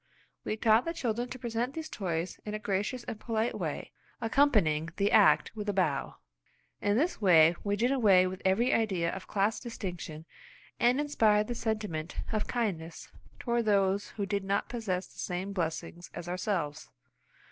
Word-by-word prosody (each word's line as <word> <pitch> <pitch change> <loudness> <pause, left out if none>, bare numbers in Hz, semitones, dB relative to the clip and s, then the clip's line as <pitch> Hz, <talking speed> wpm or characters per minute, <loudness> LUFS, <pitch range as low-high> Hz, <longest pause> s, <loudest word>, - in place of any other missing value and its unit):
We 215 - -2
taught 220 +1 +4
the 335 +1 -3
children 245 -5 -2
to 255 - -6
present 240 +1 -3
these 320 -1 -4
toys 175 - -3
in 210 0 -4
a - - -1
gracious 215 +3 -2
and 220 - -6
polite 225 0 -1
way, - - -4 0.3
accompanying 215 - +2
the 205 0 +2
act - - +5
with 210 -1 -4
a - - +1
bow. 160 -8 0 0.7
In 205 +1 +2
this 315 -1 0
way 170 -4 +6
we 205 0 0
did 240 +5 +1
away 200 -9 +5
with 185 0 -4
every 200 +6 +3
idea 190 -7 +1
of 190 - -7
class 205 +2 +1
distinction, 175 -9 -6 0.5
and 245 +3 +4
inspired 220 -8 +3
the 240 - -3
sentiment 210 -9 -3 0.2
of 215 -2 -1
kindness 175 -9 -3 0.3
toward 235 -2 0
those 200 -1 +2
who 200 - -1
did 200 0 -1
not 200 +1 -1
possess 195 -6 -2
the - - -17
same 185 +2 -3
blessings 170 -1 -4
as 175 - -6
ourselves. 175 -4 -2
205 Hz, 170 wpm, -30 LUFS, 180-230 Hz, 0.7 s, way